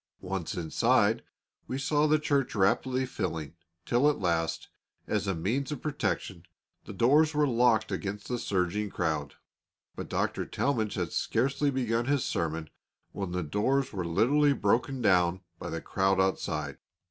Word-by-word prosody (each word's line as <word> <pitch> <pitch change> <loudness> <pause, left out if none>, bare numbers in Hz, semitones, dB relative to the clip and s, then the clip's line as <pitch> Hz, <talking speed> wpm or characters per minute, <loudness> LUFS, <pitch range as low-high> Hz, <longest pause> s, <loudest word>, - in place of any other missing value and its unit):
Once 95 +2 -4
inside, 85 -3 +2 0.5
we 130 - -3
saw 145 +2 +2
the 155 +1 +4
church 140 -5 0
rapidly 130 +6 +2
filling, 80 - -4 0.3
till 125 +5 +3
at 150 - 0
last, 80 -3 -1 0.4
as - - -1
a 95 - 0
means 120 - -1
of 150 - -3
protection, 135 - -2 0.4
the - - -8
doors 150 +5 +3
were 150 0 +4
locked 120 -4 +3
against 105 +1 -4
the 125 -1 -2
surging 100 +2 -1
crowd. 80 -6 -2 0.6
But - - -6
Dr. - - -1
Talmage 110 -7 -1
had 90 -4 -2
scarcely 140 +4 +1
begun 120 -3 0
his 140 0 +1
sermon 80 -1 -2 0.4
when 100 -3 -4
the 90 0 -1
doors 130 - 0
were 95 -3 -2
literally 130 - +3
broken 125 +3 0
down 90 -2 +3 0.2
by - - -5
the - - -4
crowd 95 0 +1
outside. 95 0 -1
110 Hz, 150 wpm, -29 LUFS, 90-135 Hz, 0.6 s, the